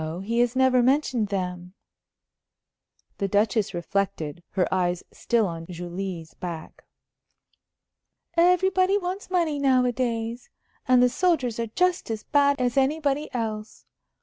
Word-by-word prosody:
He 230 +4 -1
has 245 +1 +2
never 260 -1 +4
mentioned 255 -3 +2
them." 180 -2 -4 1.4
The 200 - 0
Duchess 205 0 +1
reflected, 175 -3 -2
her 185 - +1
eyes 180 -1 0
still 235 -3 +1
on 165 -2 -5
Julie's 175 -1 -6
back. 170 -3 -8 1.5
"Everybody 370 +3 +3
wants 370 +1 -4
money 335 -5 0
nowadays. 245 -3 0 0.4
And 250 -1 +5
the - - +6
soldiers 260 -6 0
are 230 - -1
just 360 +9 0
as 220 -1 -3
bad 285 -1 +2
as 245 0 0
anybody 285 +1 +1
else. 220 -3 -5
235 Hz, 120 wpm, -25 LUFS, 195-280 Hz, 1.5 s, the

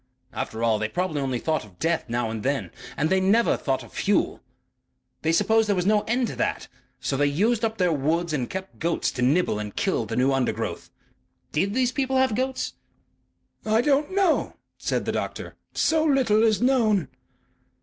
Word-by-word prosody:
After 110 +1 -4
all, 110 -2 +2
they 110 0 -1
probably 160 +1 -1
only 130 -2 -1
thought 155 +3 -1
of 100 -4 -17
death 165 - 0
now 120 -1 -1
and 110 -1 -4
then. 140 +3 -1 0.3
And 150 - +1
they 190 - +4
never 205 +5 +3
thought 135 -2 -2
of - - -15
fuel. - - 0 0.8
They 160 - +1
supposed 215 +5 +3
there 205 - +3
was 180 -1 -1
no 210 +1 +4
end 245 +2 +1
to - - -6
that. - - -1 0.3
So 130 +2 -2
they 145 +1 +2
used 215 +11 +1
up 225 0 0
their 180 -3 +2
woods 160 +4 0
and 130 -5 -1
kept 190 0 -7
goats 170 +1 0
to 125 - -5
nibble 135 -2 +2
and 105 -1 -6
kill - - 0
the - - -4
new 130 +2 +2
undergrowth. 135 -2 -2 0.6
DID 195 +7 0
these 255 -1 +2
people 265 0 0
have 260 -3 +3
goats?" 260 +3 -2 0.9
"I 220 +1 +2
don't 290 +3 +2
know," 380 -4 +1 0.2
said - - -2
the - - 0
doctor. - - -4 0.2
"So 320 -1 +2
little 260 -8 +3
is 225 0 +3
known." 220 - +3
185 Hz, 190 wpm, -25 LUFS, -, 0.9 s, they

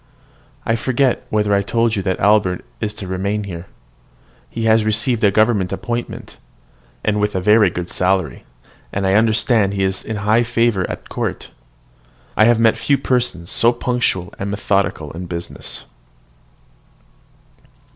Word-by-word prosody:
I 115 - +1
forget 130 +1 0
whether 105 -2 +1
I 100 - +3
told 115 +3 +1
you 100 - -1
that 95 -1 -2
Albert 100 -3 +2
is 110 -2 -2
to 100 - -7
remain 100 +3 -2
here. 90 -3 -7 0.8
He 115 - -4
has 110 0 +4
received 110 +2 0
a 105 - +6
government 105 -2 +2
appointment, 120 +5 -5 0.7
with 105 -1 +1
a - - +1
very 105 +1 +5
good 85 0 -5
salary; 95 -1 0 0.5
and 95 0 -2
I 95 - +2
understand 110 -1 +3
he 95 - 0
is 95 0 -1
in 110 - -4
high 110 +3 +4
favour 115 -5 +1
at - - -7
court. - - -4 0.8
I 110 - +5
have 120 0 +4
met 115 -1 +4
few 140 - +2
persons 120 -12 -1
so 115 - +4
punctual 120 -7 -1
and 100 - -3
methodical 100 -6 -1
in 90 +2 -7
business. 85 0 -5
105 Hz, 145 wpm, -19 LUFS, 95-115 Hz, 0.8 s, a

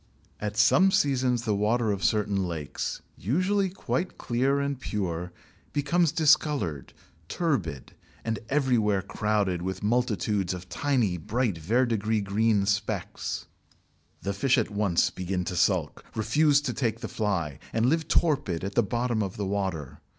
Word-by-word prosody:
At 105 0 -4
some 145 - +5
seasons 130 -8 +2
the 110 -3 0
water 110 +2 +1
of 100 -1 -3
certain 105 -2 +1
lakes, 75 -4 -4 0.2
usually 185 - +1
quite 180 -1 -3
clear 130 +4 +1
and 140 -2 -2
pure, 90 -7 -3 0.4
becomes 165 +3 +2
discoloured, 140 - +2 0.4
turbid, 90 - -2 0.3
and 115 -1 -1
everywhere 120 -9 +2
crowded 105 -4 0
with 95 +2 -4
multitudes 105 -5 0
of 90 0 -9
tiny, 120 -5 +1
bright, 105 +2 -1
verdigris 110 +2 +1
green 105 +1 +2
specks. 100 +1 -2 0.8
The 100 - -1
fish 130 +7 +2
at 110 -3 0
once 100 -4 +2
begin 90 0 -3
to 90 - -3
sulk, - - +1
refuse 145 +6 +3
to 135 -4 -2
take 115 -2 -1
the - - -3
fly, 90 -10 -2
and 115 0 +1
live 160 +5 +1
torpid 135 - +1
at 100 +1 -3
the 120 - +4
bottom 120 +1 -1
of 95 -3 -3
the 100 - -2
water. 90 -8 -3
105 Hz, 145 wpm, -27 LUFS, 95-130 Hz, 0.8 s, some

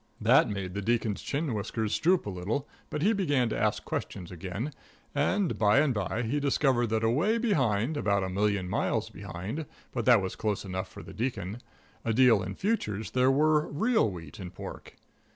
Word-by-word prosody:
That - - +5
made 95 -3 -4
the 100 - -3
Deacon's 110 -1 0
chin 145 -2 -2
whiskers 110 +1 -2
droop 180 +2 +3
a - - -3
little, 100 +10 -2 0.2
but 150 - -2
he 215 +4 +4
began 145 - +1
to - - -2
ask - - 0
questions 90 -2 -4
again, 95 - -5 0.4
and 175 +6 +1
by 105 +1 +4
and 145 -2 +4
by 100 +2 -2
he 120 +6 0
discovered 135 -3 +2
that 110 0 0
away 155 - +2
behind 135 - +1
about 100 -7 +1
a 95 - -2
hundred 100 0 +1
miles - - -1
behind, 105 - -6 0.2
but 120 -3 -2
that 120 -3 +7
was 95 -1 -3
close 105 -2 -2
enough 95 0 -3
for - - -10
the - - -10
Deacon 110 -1 -3 0.4
a 115 - 0
deal 120 -3 +5
in 95 +1 -5
futures 110 - -1
there 130 +1 +3
were 150 +2 +3
real 220 - +2
wheat 85 -4 -9
and 90 -1 -8
pork. - - -8
115 Hz, 190 wpm, -29 LUFS, 100-145 Hz, 0.4 s, that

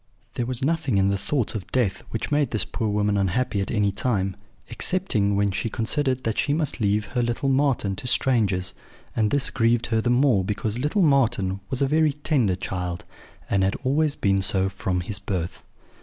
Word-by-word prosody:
There 120 -2 -2
was 130 0 -3
nothing 155 -8 +1
in 95 0 +3
the 100 - +1
thoughts 120 +3 -1
of 105 -4 -6
death 100 -8 +1
which 115 - -4
made 145 -3 +2
this 110 - 0
poor 110 -3 -2
woman 105 0 +1
unhappy 100 +2 0
at 95 - -3
any 105 -3 +1
time, 95 -3 -1 0.3
excepting 110 - 0
when 100 0 +2
she 100 +4 -2
considered 130 +4 0
that 110 -1 -1
she 145 - +1
must 155 -6 -2
leave 105 +1 +1
her 125 - -1
little 120 +4 -1
Marten 130 -8 +1
to 125 - -5
strangers; 100 -8 +2 0.4
and 110 -2 +2
this 140 +2 0
grieved 115 0 +2
her 110 - +3
the 120 - 0
more 125 -5 +3
because 105 +3 -2
little 150 +9 +1
Marten 115 - +2
was 130 +1 0
a - - +2
very 155 0 +3
tender 135 - +1
child, 90 -1 -4 0.4
and 100 - +1
had 95 - +1
always 145 +3 +1
been 95 -1 +1
so 95 0 +2
from 95 -1 -2
his 100 +3 -4
birth. 90 -4 -4
110 Hz, 195 wpm, -24 LUFS, 100-135 Hz, 0.4 s, in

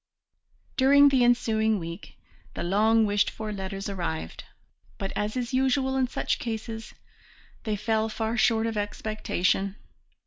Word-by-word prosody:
During 280 +2 +6
the 265 -3 +3
ensuing 220 -3 +2
week 170 -1 -8 0.4
the - - -3
long 215 +5 +3
wished 205 0 +2
for 215 -1 -6
letters 195 0 -5
arrived, 170 - -4 0.5
but, 195 - -4
as 210 +4 -2
is 245 +1 -3
usual 265 0 +1
in 260 -1 +2
such - - -2
cases, 225 -1 -5 0.7
they 215 -2 0
fell 220 +1 0
far 220 +1 -2
short 225 -1 +3
of 225 -1 -2
expectation. 205 -2 -1
220 Hz, 135 wpm, -27 LUFS, 205-240 Hz, 0.7 s, During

